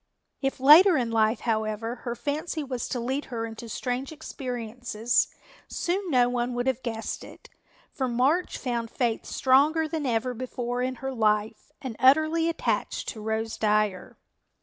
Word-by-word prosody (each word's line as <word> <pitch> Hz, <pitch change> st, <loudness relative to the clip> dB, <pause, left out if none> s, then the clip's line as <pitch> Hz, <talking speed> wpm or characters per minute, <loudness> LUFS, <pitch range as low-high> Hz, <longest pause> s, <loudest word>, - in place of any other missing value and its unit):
If 270 Hz, -1 st, -1 dB
later 315 Hz, +6 st, +8 dB
in 240 Hz, -3 st, -1 dB
life, 220 Hz, 0 st, +2 dB
however, 225 Hz, +1 st, -2 dB
her 235 Hz, 0 st, -5 dB
fancy 305 Hz, +4 st, -3 dB
was 255 Hz, -3 st, -4 dB
to 250 Hz, -, -2 dB
lead 260 Hz, +5 st, -2 dB
her 230 Hz, -2 st, -4 dB
into 225 Hz, +1 st, -8 dB
strange 255 Hz, +4 st, -3 dB
experiences, 245 Hz, -5 st, -2 dB, 0.4 s
soon 370 Hz, +2 st, -2 dB
no 250 Hz, -4 st, +4 dB
one 245 Hz, 0 st, -1 dB
would 245 Hz, 0 st, -1 dB
have 260 Hz, -1 st, 0 dB
guessed 225 Hz, -3 st, -4 dB
it, -, -, -14 dB, 0.4 s
for 265 Hz, -4 st, -2 dB
March 265 Hz, +9 st, +1 dB
found 235 Hz, -3 st, -3 dB
Faith 235 Hz, -2 st, -1 dB
stronger 295 Hz, +5 st, +3 dB
than 310 Hz, -3 st, -3 dB
ever 240 Hz, +1 st, 0 dB
before 245 Hz, 0 st, -3 dB
in 255 Hz, +1 st, -1 dB
her 270 Hz, -, -2 dB
life 215 Hz, +1 st, 0 dB
and 255 Hz, -4 st, -5 dB
utterly 315 Hz, +5 st, +4 dB
attached 335 Hz, -, -2 dB
to 220 Hz, -, -7 dB
Rose 220 Hz, +1 st, -2 dB
Dyer. 210 Hz, -3 st, 0 dB
245 Hz, 155 wpm, -26 LUFS, 225-275 Hz, 0.4 s, later